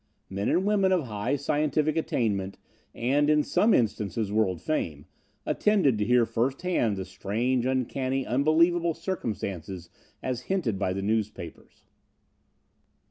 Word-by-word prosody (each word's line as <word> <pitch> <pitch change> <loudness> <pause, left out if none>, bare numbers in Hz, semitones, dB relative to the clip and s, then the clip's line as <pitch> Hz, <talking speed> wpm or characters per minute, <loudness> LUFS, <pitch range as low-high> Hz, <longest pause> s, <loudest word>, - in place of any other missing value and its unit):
Men 100 +1 -1
and 185 - +2
women 200 -2 +3
of 180 -4 +2
high 115 +3 -2
scientific 150 +2 0
attainment, 105 -11 -1 0.4
and, 140 +5 +2
in 150 -1 +4
some 220 +8 +2
instances, 110 - 0
world 105 -5 +1
fame, 80 - -3 0.4
attended 185 - +2
to 105 - +1
hear 125 +1 +4
first 130 +7 -1
hand 120 - +1
the 95 - -4
strange, 120 +7 -1
uncanny, 130 +1 -1
unbelievable 165 +5 +2
circumstances 95 - -5 0.3
as 125 -1 -2
hinted 155 - 0
by 95 -2 0
the 95 +1 -3
newspapers. 105 -5 -4
125 Hz, 130 wpm, -27 LUFS, 105-155 Hz, 0.4 s, in